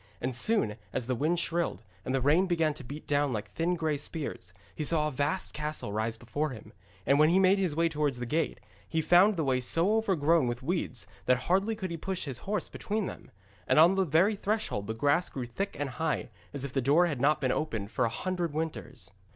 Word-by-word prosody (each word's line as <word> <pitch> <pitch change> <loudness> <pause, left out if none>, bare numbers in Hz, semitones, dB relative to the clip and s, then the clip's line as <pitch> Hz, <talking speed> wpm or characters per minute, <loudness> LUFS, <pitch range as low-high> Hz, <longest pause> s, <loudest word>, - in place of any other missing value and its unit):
And 125 0 -2
soon, 130 - +1
as 130 - -2
the 130 - -1
wind 155 +7 +1
shrilled, 170 - -1 0.2
and 130 - -1
the 135 - +1
rain 155 +8 +4
began 165 -3 +1
to 145 - -10
beat 145 +5 -8
down 145 -1 +1
like 110 -3 -4
thin 170 +2 0
grey 160 -3 -1
spears, 140 - -5 0.2
he 155 - -4
saw 150 0 +2
a - - -3
vast 145 +7 -1
castle 150 -8 -4
rise 110 +1 -1
before 135 +7 -2
him, 110 -4 -10 0.3
and 140 +1 +4
when 155 +1 +6
he 175 - +4
made 190 +1 +4
his 180 -6 0
way 165 +1 +3
towards 150 -5 -1
the 120 - -4
gate, 155 +6 -1 0.3
he 160 - 0
found 175 +6 +5
the 160 - +1
way 130 -2 +1
so 170 - +3
overgrown 170 - +2
with 120 +1 -3
weeds 160 -5 -2 0.2
that 125 - +5
hardly 195 - +1
could 190 -4 -5
he 170 - -3
push 190 +2 -4
his 130 -4 -4
horse 210 -4 -1
between 215 0 -3
them. - - -8 0.4
And - - +3
on 165 +4 +7
the 195 0 +2
very 180 +6 +3
threshold 205 - -2
the 110 - -3
grass 145 +8 +2
grew 130 -2 -5
thick 195 +12 -4
and 145 - -1
high, 160 +4 -2 0.2
as 140 -1 -2
if 135 - -6
the 135 - +1
door 145 +8 +4
had 145 -8 -2
not 150 +2 +3
been 130 -2 +1
opened 110 -10 -2
for - - 0
a - - +1
hundred 175 +5 -2
winters. 135 -9 -4
150 Hz, 230 wpm, -29 LUFS, 130-175 Hz, 0.4 s, on